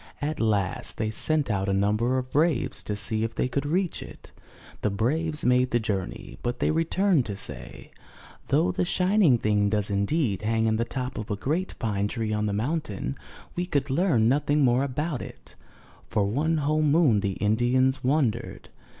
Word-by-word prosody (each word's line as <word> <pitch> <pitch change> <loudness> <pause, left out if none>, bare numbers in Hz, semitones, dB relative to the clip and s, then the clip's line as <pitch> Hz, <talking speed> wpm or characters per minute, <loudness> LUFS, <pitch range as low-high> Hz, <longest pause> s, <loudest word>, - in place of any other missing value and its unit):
At 150 +1 -3
last 105 -4 0
they 110 0 -1
sent 150 +2 0
out 100 -1 -1
a - - +1
number 105 +6 +1
of 130 0 -4
braves 155 -3 +1
to 105 - -2
see 110 +2 -1
if 115 0 -3
they - - 0
could 140 +2 -2
reach 180 +3 0
it. - - -11 0.5
The 105 - +1
braves 150 +10 -1
made 125 +1 +3
the 120 - +2
journey, 95 - -4
but 120 0 -2
they - - +1
returned 165 -1 +2
to 100 -2 -4
say: 65 -9 -8 0.6
'Though 90 - +2
the 90 - -1
shining 180 - +3
thing 105 -2 +1
does 105 -1 -1
indeed 100 - 0
hang 110 +1 +1
in 110 0 +2
the 115 - 0
top 130 0 -4
of 110 - -6
a 105 - 0
great 155 - -2
pine 105 -3 -1
tree 110 0 -2
on 105 0 0
the - - -1
mountain, 105 - -2 0.4
we 175 0 -2
could 140 -5 -1
learn 135 - +3
nothing 145 +3 +2
more 125 +2 +3
about 140 +1 -2
it/* - - -11 0.6
For 105 - +1
one 150 +10 0
whole 155 +1 +1
moon 150 -7 +4
the 100 -1 -1
Indians 120 +6 +1
wondered. 125 -4 -1
120 Hz, 185 wpm, -26 LUFS, 105-150 Hz, 0.6 s, moon